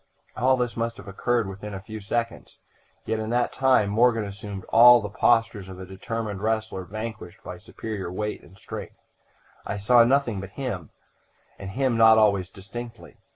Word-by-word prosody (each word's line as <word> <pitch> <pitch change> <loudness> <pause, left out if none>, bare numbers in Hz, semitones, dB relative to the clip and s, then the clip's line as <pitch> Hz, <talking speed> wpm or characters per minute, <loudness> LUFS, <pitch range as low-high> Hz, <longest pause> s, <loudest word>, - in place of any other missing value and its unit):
"All 130 +1 +3
this 125 -2 -2
must 115 0 -2
have - - -12
occurred 115 +3 0
within 100 +1 -7
a - - -5
few 110 +3 -8
seconds, 115 +3 -4 0.5
yet 110 - -1
in 110 0 -4
that 120 +1 0
time 130 -6 +3
Morgan 115 +1 +3
assumed 100 -1 -7
all 120 +1 +8
the 105 -2 -6
postures 115 -3 +1
of 95 -1 -9
a 95 - -7
determined 100 +2 -5
wrestler 110 -3 -2
vanquished 110 -3 -7
by 90 -1 -7
superior 105 -1 -6
weight 105 +3 -4
and 95 - -18
strength. - - -8 0.7
I 100 - -4
saw 120 +4 +5
nothing 120 -4 +1
but 95 0 -9
him, 100 - -4 0.7
and 95 - -6
him 130 +2 0
not 110 0 +7
always 100 -4 +3
distinctly. 115 +5 -10
110 Hz, 170 wpm, -25 LUFS, 100-115 Hz, 0.7 s, all